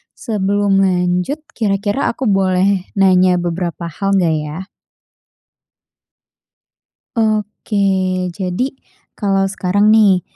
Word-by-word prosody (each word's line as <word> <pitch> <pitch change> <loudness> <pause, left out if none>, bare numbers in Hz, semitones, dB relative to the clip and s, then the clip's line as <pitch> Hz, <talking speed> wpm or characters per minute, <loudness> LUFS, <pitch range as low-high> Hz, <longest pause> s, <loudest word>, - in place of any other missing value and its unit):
sebelum 205 -3 0
lanjut 180 - 0 0.2
kira-kira 205 +3 0
aku 255 0 -3
boleh 190 0 +1
nanya 185 -1 +4
beberapa 175 0 -3
hal, 195 +5 -2
nggak 170 -4 +2
ya? 150 +3 -6 2.6
Oke. 200 -4 0
Jadi 195 +9 -3 0.4
kalau 195 -2 +1
sekarang 200 +2 +1
nih, 205 -4 +5
195 Hz, 85 wpm, -17 LUFS, 180-205 Hz, 2.6 s, nih